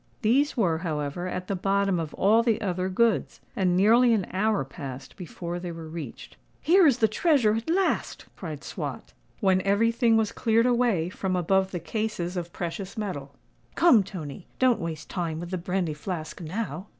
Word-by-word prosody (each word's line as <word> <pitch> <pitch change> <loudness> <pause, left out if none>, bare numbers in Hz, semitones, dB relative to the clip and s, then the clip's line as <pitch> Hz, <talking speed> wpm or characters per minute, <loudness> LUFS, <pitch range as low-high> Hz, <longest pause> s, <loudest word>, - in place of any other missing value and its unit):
These 270 +7 +2
were, 170 -8 +2
however, 155 0 -3
at 180 0 -4
the 200 - -2
bottom 195 0 +1
of 160 -2 -5
all 215 +4 +4
the 230 -2 +1
other 185 -2 -1
goods; 225 +3 +1 0.2
and 180 -2 +2
nearly 230 +5 +5
an 195 -4 -1
hour 205 -4 +1
passed 135 -1 -8
before 175 -1 -6
they 175 -1 -5
were 165 -1 -8
reached. 155 - -8 0.2
"Here 350 +2 +5
is 265 -4 +4
the 220 - +4
treasure—at 230 - +2
last!" 375 +3 0
cried - - -7
Swot, - - -6 0.3
when 190 -2 +3
every 200 +4 +2
thing 230 -1 +3
was 220 -2 +1
cleared 230 +1 +2
away 235 -9 +2
from 185 0 -2
above 190 +2 +2
the 180 - -4
cases 190 -1 -3
of 175 -1 -4
precious 185 +4 -5
metal. 145 -10 -5 0.4
"Come, 255 -11 +6
Tony—don't 195 - -2
waste 160 -2 -5
time 165 -3 -3
with 175 +1 -7
the 185 - -2
brandy 180 -2 -1
flask 160 +2 -6
now." 180 0 -4
190 Hz, 175 wpm, -26 LUFS, 170-225 Hz, 0.4 s, Come